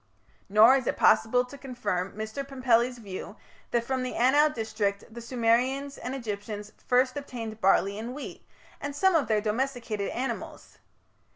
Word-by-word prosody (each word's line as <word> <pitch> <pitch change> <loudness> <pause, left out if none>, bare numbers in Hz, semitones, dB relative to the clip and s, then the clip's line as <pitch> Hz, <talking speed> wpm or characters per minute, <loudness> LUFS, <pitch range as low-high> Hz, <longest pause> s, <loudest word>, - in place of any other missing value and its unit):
Nor 220 +6 +7
is 255 - -4
it - - 0
possible 245 +3 +4
to 280 +3 -12
confirm 205 -8 -3
Mr. 220 +5 -4
Pumpelly's 255 -2 +1
view 200 -5 -8 0.3
that 235 -1 +1
from 260 +2 -2
the 255 0 -3
Anau 290 +5 +4
district 215 -5 -2
the 235 - -8
Sumerians 250 +4 +1
and 255 +2 -4
Egyptians 210 -3 -5 0.2
first 255 +1 +3
obtained 225 -6 -6
barley 195 +1 +3
and 240 +3 -6
wheat, 295 - -8 0.4
and 285 0 -5
some 380 +5 +3
of 315 -5 +2
their 215 -2 +2
domesticated 225 -2 -2
animals. 245 -2 -5
240 Hz, 155 wpm, -28 LUFS, 215-265 Hz, 0.4 s, Nor